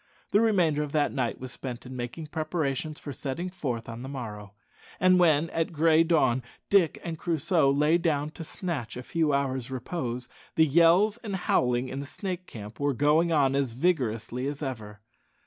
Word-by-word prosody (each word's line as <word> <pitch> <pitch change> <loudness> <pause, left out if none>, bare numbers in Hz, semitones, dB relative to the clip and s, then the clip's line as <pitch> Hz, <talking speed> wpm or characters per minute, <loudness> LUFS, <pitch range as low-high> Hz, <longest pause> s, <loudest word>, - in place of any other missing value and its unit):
The 205 - +4
remainder 175 -9 +3
of 150 -1 -4
that 150 -2 +2
night 130 -4 -2
was 130 -1 -6
spent 125 -1 -6
in 130 +1 -8
making 125 +6 -5
preparations 155 -1 -2
for 145 - -7
setting 160 +8 -4
forth 125 -11 -4
on 115 0 -7
the 130 - -6
morrow; 105 -6 -7 0.4
and 185 0 +5
when, 160 -2 +3
at 165 +1 -1
gray 160 0 +4
dawn, 140 -7 +2 0.3
Dick 190 -6 +4
and 165 -2 -5
Crusoe 165 -2 +2
lay 150 +4 +3
down 150 -3 0
to 165 - -8
snatch 150 - -4
a 125 - -6
few 160 +2 0
hours' 135 -3 -1
repose, 125 -2 -4 0.3
the 160 - +5
yells 170 - +4
and 210 -5 -4
howling 125 -8 +1
in 130 +2 -5
the 140 - -6
Snake 185 +2 -5
camp 105 0 -9
were 145 -1 +1
going 155 +5 +3
on 140 -4 +3
as 135 -4 0
vigorously 125 -4 0
as 145 +1 -4
ever. 105 -6 -6
145 Hz, 180 wpm, -27 LUFS, 125-165 Hz, 0.4 s, and